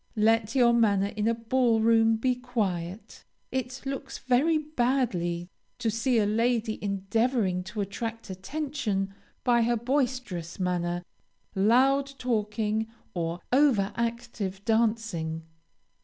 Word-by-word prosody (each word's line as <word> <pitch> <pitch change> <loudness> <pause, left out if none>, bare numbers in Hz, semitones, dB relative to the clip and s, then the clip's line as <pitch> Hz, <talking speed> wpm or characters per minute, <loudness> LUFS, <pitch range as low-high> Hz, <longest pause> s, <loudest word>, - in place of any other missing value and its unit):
Let 225 +1 +2
your 240 -2 +5
manner 200 -4 +3
in 215 0 0
a 230 - +2
ball 230 0 +2
room 225 0 +4
be 255 +3 +1
quiet. 210 -7 -3 0.3
It 260 0 -3
looks 270 0 -4
very 280 +6 +2
badly 240 - 0 0.3
to 225 - 0
see 235 +3 +1
a 215 - +3
lady 225 +1 0
endeavoring 200 0 0
to 210 +2 -4
attract 225 +2 -5
attention 210 -3 -3 0.3
by 240 -1 +4
her 235 +1 +2
boisterous 245 - -2
manner, 175 -1 -1 0.5
loud 265 +7 +3
talking, 220 -2 -1 0.3
or 170 0 -3
over 255 -8 +4
active 225 -4 -3
dancing. 220 -8 0
225 Hz, 115 wpm, -28 LUFS, 195-245 Hz, 0.5 s, your